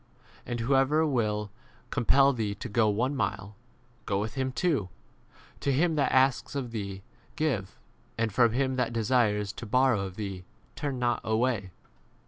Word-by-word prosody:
And 120 -1 -3
whoever 135 +5 +3
will 105 -7 -1 0.4
compel 135 +2 +4
thee 110 -4 -2
to 105 - -6
go 110 -1 +2
one 125 +7 0
mile, 100 -5 -3 0.5
go 100 -1 +1
with 105 +1 -3
42 135 - -2
him 130 0 -1
two. 135 - 0 0.7
To 140 - 0
him 160 +5 +2
that 145 -2 +1
asks 130 +2 +2
of 130 -4 -3
thee 100 -3 -5 0.3
give, 130 - -1 0.4
and 110 -2 0
from 120 +1 +4
him 130 +1 0
that 120 -2 0
desires 105 -3 +1
to 120 -1 -8
borrow 125 -2 +3
of 95 -2 -6
thee 95 -3 -5 0.3
turn 140 -3 -3
not 120 -1 0
away. 110 -3 0
120 Hz, 160 wpm, -28 LUFS, 105-135 Hz, 0.7 s, compel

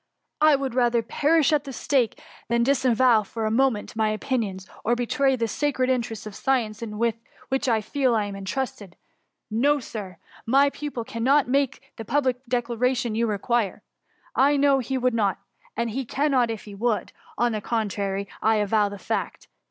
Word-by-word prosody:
— - - -44
I - - +6
would 270 -2 -2
rather 240 -2 +2
perish 305 +6 +2
at 295 -2 +2
the 275 - -6
stake, 255 -3 0 0.3
than 235 0 +2
dis 275 +1 +2
avow, 240 -2 +5
for 220 +2 -5
a 215 - 0
moment, 235 -3 +1
my 220 -1 +1
opinions, 215 -4 -2 0.2
or 240 - +2
betray 265 +3 +1
the 230 -2 -1
sacred 260 +1 0
interests 230 -4 -2
of 210 - -7
science 230 -3 -1
with 230 0 -1 0.3
which 265 0 0
I 225 -2 +2
feel 255 +2 +1
I 215 -2 +1
am 200 -1 -6
intrusted. 195 -2 -4 0.6
No, 285 +7 +3
Sir! 205 -7 -7 0.3
Tny 280 +3 +5
pupil 285 -5 -5
cannot 255 +5 +2
make 275 0 -1
the 225 - -5
public 260 -1 0
declaration 245 -1 0
you 230 +1 +1
require, 215 0 -1 0.5
I 285 +2 +4
know 280 -1 +4
he 265 +1 -2
would 255 -1 +1
not 205 -4 +1 0.2
— - - -30
and 235 0 -1
he 265 +5 -2
cannot 260 -1 +1
if 225 -2 -4
he 205 - -10
would; 220 +2 -1 0.2
— - - -24
on 240 0 +2
the 215 -1 -3
contrary, 200 -3 -2
I 220 0 +3
avow 210 0 +2
the 200 - -7
fact. 190 - -4
235 Hz, 185 wpm, -25 LUFS, 215-265 Hz, 0.6 s, I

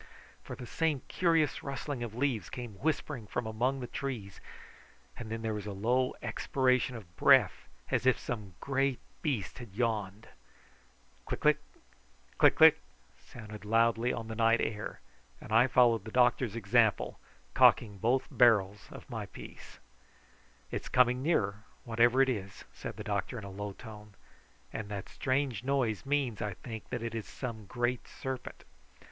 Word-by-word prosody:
For - - -8
the 125 - -8
same 150 +1 -1
curious 165 -5 +2
rustling 140 -1 -4
of 115 -2 -5
leaves 125 -7 -1
came 120 -3 -6
whispering 145 -6 -2
from 125 +2 -3
among 125 +5 -1
the - - -3
trees, 120 -7 -5 0.7
and 115 -2 -8
then 115 0 -4
there 110 -1 -1
was 105 -1 -5
a 105 - -4
low 125 +6 +1
expiration 130 -1 +1
of 90 -6 -11
breath, - - +4 0.2
as 130 - +1
if 130 - +5
some 105 -7 -6
great 135 -1 0 0.2
beast 130 - -2
had 120 -6 -10
yawned. 110 -3 -2 1.0
Click - - -3
click, - - +4 0.8
click - - +6
click - - +7 0.5
sounded 110 -3 -10
loudly 115 +2 +2
on 115 -1 -4
the 110 - -5
night 115 +1 +3
air, 105 -1 -3 0.4
and - - -11
I 115 +3 +6
followed 120 -4 +4
the 110 - -8
doctor's 120 -2 +3
example, 110 -1 +2 0.3
cocking 105 -4 +4
both 125 +6 +2
barrels 105 -5 +3
of - - -11
my - - -5
piece. - - -12 0.9
"It's - - -4
coming 125 0 +4
nearer, 105 -9 0 0.2
whatever 120 +3 +4
it 135 - +1
is," 100 -5 -4
said - - -7
the 105 - -6
doctor 105 +2 -2
in 110 - -7
a 100 - -7
low 100 +1 -5
tone, 105 -2 -12 0.6
"and 110 -2 -5
that 100 -2 -5
strange 130 -4 -1
noise 130 -4 0
means, 135 -6 0
I 105 -3 -3
think, 110 0 -8
that 120 - -3
it 115 -1 -4
is 115 -2 -4
some 110 -5 -6
great 120 +2 -1
serpent." 130 -1 -6
115 Hz, 160 wpm, -31 LUFS, 105-130 Hz, 1.0 s, click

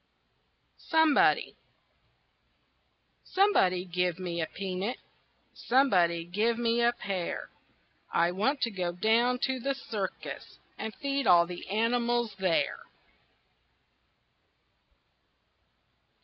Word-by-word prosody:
SOMEBODY 320 -2 +3 1.7
Somebody 190 - +2
give 180 -1 -1
me 175 -2 -4
a 160 - -2
peanut, 195 +6 -4 0.6
Somebody 180 -10 +2
give 215 +6 0
me 235 0 +1
a 235 0 +4
pear; 195 -7 -4 0.6
I 170 +1 +2
want 255 +10 0
to 230 - 0
go 180 -3 -3
down 230 +7 +2
to 265 -1 -2
the 275 +3 -2
circus 210 -7 -6 0.2
And 220 - -5
feed 280 -1 -2
all 170 -1 +6
the 175 0 -9
animals 235 +1 0
there. 185 -3 0
215 Hz, 90 wpm, -29 LUFS, 180-245 Hz, 1.7 s, all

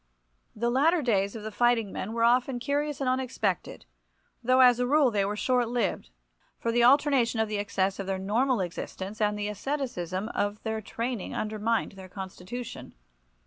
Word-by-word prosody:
The 235 +2 0
latter 310 +6 +3
days 200 -4 +1
of 220 - -7
the 215 - -5
fighting 230 -2 +2
men 215 - -4
were 230 0 0
often 245 +2 +3
curious 285 +3 -1
and 270 - 0
unexpected, 255 -7 -1 0.6
though 255 +2 +4
as 245 -1 +6
a 250 - +1
rule 285 -2 +4
they 205 -2 +1
were 205 +2 -1
short 245 +1 +1
lived, 245 -1 -1 0.5
for 230 - -1
the 235 +1 +3
alternation 260 -3 +4
of 220 - +2
the 210 -1 -2
excess 195 -1 -1
of 195 - -4
their 195 -1 -1
normal 225 +5 +1
existence 190 +4 -5
and 210 0 +1
the 205 0 -2
asceticism 210 - -3
of 205 -1 -2
their 220 -1 -2
training 230 0 -4
undermined 215 +1 -1
their 190 -1 -11
constitution. 190 +5 -7
230 Hz, 175 wpm, -28 LUFS, 205-250 Hz, 0.6 s, as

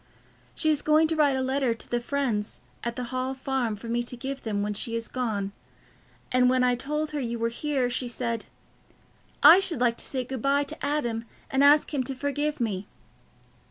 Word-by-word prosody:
She 315 - +2
is 295 - +1
going 310 +1 +4
to 325 - +1
write 290 -3 +3
a 260 - 0
letter 260 -2 +1
to - - -6
the 240 - 0
friends 240 -6 -2 0.2
at 235 0 -3
the 250 - -3
Hall 255 +1 -1
Farm 260 -4 -1
for 220 +3 -10
me 235 +1 0
to 240 +1 -5
give 270 +2 -5
them 205 -2 -2
when 210 0 -1
she 230 +3 -2
is 230 0 -3
gone, 215 -6 -2 0.8
and 250 0 +4
when 255 0 +3
I 250 0 +4
told 300 +5 -2
her 300 - -2
you 235 -3 -2
were 230 0 0
here, 265 +1 -1
she 245 +1 -1
said, 235 -2 -3 1.0
'I 320 +6 +10
should 355 -8 -1
like 240 -1 +2
to - - -6
say 260 -2 -2
good 255 -1 -5
bye 280 +2 +2
to 310 +2 -7
Adam 240 -6 -1 0.3
and 270 +1 +3
ask 295 +2 +5
him 275 -3 +1
to 270 - -3
forgive 290 +2 -2
me. 205 -4 -2
255 Hz, 210 wpm, -27 LUFS, 235-285 Hz, 1.0 s, I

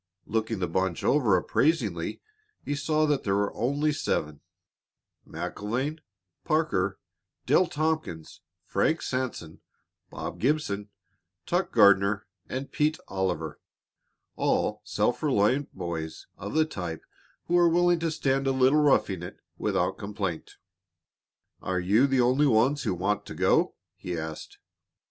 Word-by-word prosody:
Looking 110 0 -1
the 90 -2 -1
bunch 95 0 -1
over 120 -10 +4
appraisingly, 160 - 0 0.4
he 145 - -1
saw 155 +2 +1
that 145 -2 +1
there 100 -1 +1
were 100 0 0
only 145 +5 0
seven 75 - -2 0.9
MacIlvaine, 130 +9 -3 0.4
Parker, 155 - +1 0.5
Dale 185 - +4
Tompkins, 155 - -3 0.2
Frank 160 +1 +1
Sanson, 125 -11 -4 0.5
Bob - - -6
Gibson, 115 -8 0 0.6
Turk 180 +2 0
Gardner 100 -2 +5 0.2
and 135 +2 -4
Pete 155 0 +1
Oliver, 95 -2 -2 0.8
all - - 0
self - - 0
reliant 125 +8 +2
boys 85 -3 -5
of 100 +6 -7
the 155 0 +4
type 90 - -5 0.4
who 175 - -3
were 175 -1 +6
willing 175 0 +3
to 165 0 0
stand 135 -3 0
a - - +3
little 130 +3 +4
roughing 105 - +2
it 90 - -8 0.2
without - - 0
complaint. 100 -5 -4 1.1
"Are 95 0 -1
you 105 +9 +3
the 135 -2 +2
only 130 +5 +3
ones 130 +4 +3
who 90 - -1
want 100 +4 -1
to - - -7
go?" - - +2 0.2
he 90 -2 -5
asked. 80 -1 -6
120 Hz, 130 wpm, -27 LUFS, 95-150 Hz, 1.1 s, were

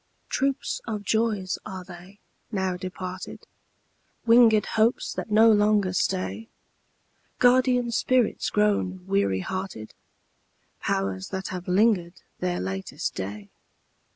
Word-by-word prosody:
Troops 275 0 -1
of 210 -2 -3
joys 210 -3 0
are 190 -3 -7
they, 180 +2 -13 0.3
now 190 -3 -1
departed? 185 0 -7 0.8
Winged 230 -2 +6
hopes 225 +2 +1
that - - -5
no 220 +2 +6
longer 205 -3 +3
stay? 190 +4 -1 0.9
Guardian 250 -1 +3
spirits 250 0 +1
grown 200 -3 0
weary 190 - +1
hearted? 185 - -5 0.9
Powers 95 -1 -2
that 190 0 -4
have 180 -1 -6
linger'd 180 -3 +2 0.2
their 180 -1 -1
latest 95 +1 -4
day? 100 +1 -6
190 Hz, 105 wpm, -26 LUFS, 180-220 Hz, 0.9 s, Winged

